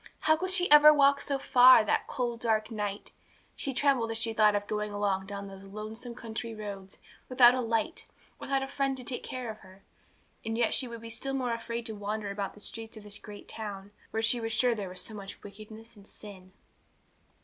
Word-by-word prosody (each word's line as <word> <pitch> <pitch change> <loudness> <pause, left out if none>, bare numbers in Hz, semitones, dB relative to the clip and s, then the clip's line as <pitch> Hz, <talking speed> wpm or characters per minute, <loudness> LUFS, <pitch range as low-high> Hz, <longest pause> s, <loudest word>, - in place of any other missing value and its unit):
How 315 - +4
could 370 +4 -3
she 365 -1 +4
ever 295 +1 +10
walk 280 -1 +4
so 280 - -1
far, 255 -3 +7
that 215 - 0
cold, 240 -3 -3
dark 220 -1 0
night? 205 -2 -4 0.4
She 275 - -4
trembled 255 -3 +1
as 225 - -2
she 225 0 -1
thought 210 -1 +4
of 205 0 -1
going 210 0 -3
alone 200 -2 -1
down 200 0 -6
those 195 0 -11
lonely 215 +4 -8
country 230 -1 -6
roads, 200 -2 -8 0.3
without 250 -1 +7
a 255 - 0
light, 230 +7 -2 0.3
without 270 -1 -1
a - - -4
friend 275 -1 -1
to 255 - -4
take 245 0 -3
care 250 -3 -5
of 215 - -12
her. 190 +1 -17 0.6
And 225 0 -3
yet 235 -2 +2
she 260 - 0
would 235 -1 -8
be 230 0 -8
still 270 +4 -2
more 250 -3 -1
afraid 230 0 -5
to 220 - -5
wander 205 0 -4
about 200 -1 -4
the - - -14
streets 225 +2 -5
of 215 - -11
this 210 0 -6
great 205 -1 -11
town, 200 -2 -7 0.2
where 220 0 -2
she 235 +1 +2
was 225 0 -3
sure 245 +1 +3
there 205 -4 -5
was 180 0 -7
so 220 - -6
much 200 -2 -9
wickedness 215 +3 -12
and 200 -1 -16
sin. 190 -3 -11
225 Hz, 215 wpm, -29 LUFS, 205-250 Hz, 0.6 s, ever